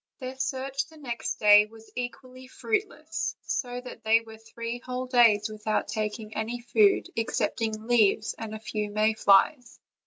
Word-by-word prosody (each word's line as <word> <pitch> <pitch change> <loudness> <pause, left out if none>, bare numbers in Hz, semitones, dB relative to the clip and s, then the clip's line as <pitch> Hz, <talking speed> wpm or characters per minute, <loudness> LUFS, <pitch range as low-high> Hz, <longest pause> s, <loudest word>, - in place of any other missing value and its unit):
Their 255 -1 -6
search 265 +1 -2
the 320 0 -17
next 240 -6 -4
day 210 0 +6
was 225 0 -16
equally 255 +1 -7
fruitless; 330 - -3
so 245 -2 -3
that 250 - -11
they 225 +1 +4
were 220 -1 -13
three 230 +1 -6
whole 250 +1 -4
days 230 -5 +4
without 215 0 -2
taking 215 0 -4
any 225 +3 -3
food 220 -4 +3
excepting 220 -1 -2
leaves, 220 -2 +3
and 220 -1 -5
a - - -7
few 210 -1 -4
may 215 +1 +2
flies. 220 +5 +3
230 Hz, 155 wpm, -27 LUFS, 215-255 Hz, -, day